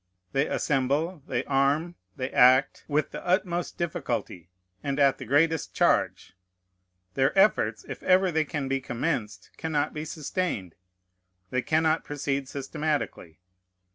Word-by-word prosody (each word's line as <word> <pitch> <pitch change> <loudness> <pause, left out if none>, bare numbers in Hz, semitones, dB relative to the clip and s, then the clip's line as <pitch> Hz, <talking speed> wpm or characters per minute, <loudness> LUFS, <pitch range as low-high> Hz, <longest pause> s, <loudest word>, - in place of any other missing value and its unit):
They 135 +2 +1
assemble, 150 +5 0
they 125 0 -1
arm, 145 +5 +1 0.2
they 130 0 -4
act, 130 +2 +4
with 150 0 0
the - - -7
utmost 175 -1 0
difficulty, 120 - -3 0.3
and 140 0 -2
at 140 -1 +4
the 135 - -6
greatest 155 +5 +1
charge. - - +1 0.8
Their 135 - +1
efforts, 110 - +3
if 135 -3 -7
ever 185 0 +4
they 160 -1 +1
can 145 -3 -3
be 135 0 -1
commenced, 120 -4 -3
cannot 155 -3 -1
be 155 0 -5
sustained. 150 - -3 0.8
They 130 - +1
cannot 160 +3 +1
proceed 140 -2 -3
systematically. 140 - -3
145 Hz, 130 wpm, -27 LUFS, 135-160 Hz, 0.8 s, act